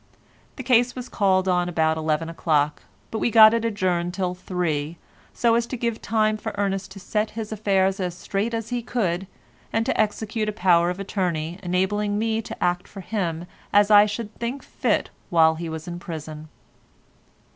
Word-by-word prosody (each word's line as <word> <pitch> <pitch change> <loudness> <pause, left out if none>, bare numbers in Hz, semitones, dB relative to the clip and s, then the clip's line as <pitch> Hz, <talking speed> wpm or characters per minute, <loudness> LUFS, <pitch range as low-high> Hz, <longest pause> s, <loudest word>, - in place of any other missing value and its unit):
The 260 - -6
case 245 0 +3
was 250 -1 -6
called 190 -2 +2
on 180 -1 +1
about 160 -2 +1
eleven 155 0 -1
o'clock, 150 -3 0 0.3
but 220 - -2
we - - +1
got 220 -1 +8
it 230 -1 0
adjourned 185 -5 -1
till 185 -2 -1
three, 170 -4 -2 0.3
so 235 -1 +2
as 235 0 +1
to 255 - -4
give 235 -1 -2
time 215 0 +1
for 215 - -6
Ernest 195 -1 -1
to 195 - -10
set 210 +3 -1
his 220 -1 -4
affairs 195 -2 +1
as 180 -2 -2
straight 210 +5 -2
as 225 -1 -4
he 245 -1 -2
could, 195 -6 -1 0.4
and 225 +1 0
to - - +2
execute 215 +1 -1
a - - -3
power 175 -4 +3
of 180 +1 -4
attorney 180 -4 -2
enabling 200 +3 0
me 225 +1 0
to 225 - -6
act 180 0 0
for 195 - -9
him 175 -5 -3 0.3
as 205 +1 +4
I 205 0 +8
should 210 +1 -5
think 245 +4 -3
fit - - -1 0.2
while 160 -3 +5
he 165 +1 -5
was 160 +1 -6
in 175 0 -5
prison. 155 -2 -7
195 Hz, 185 wpm, -24 LUFS, 175-220 Hz, 0.4 s, got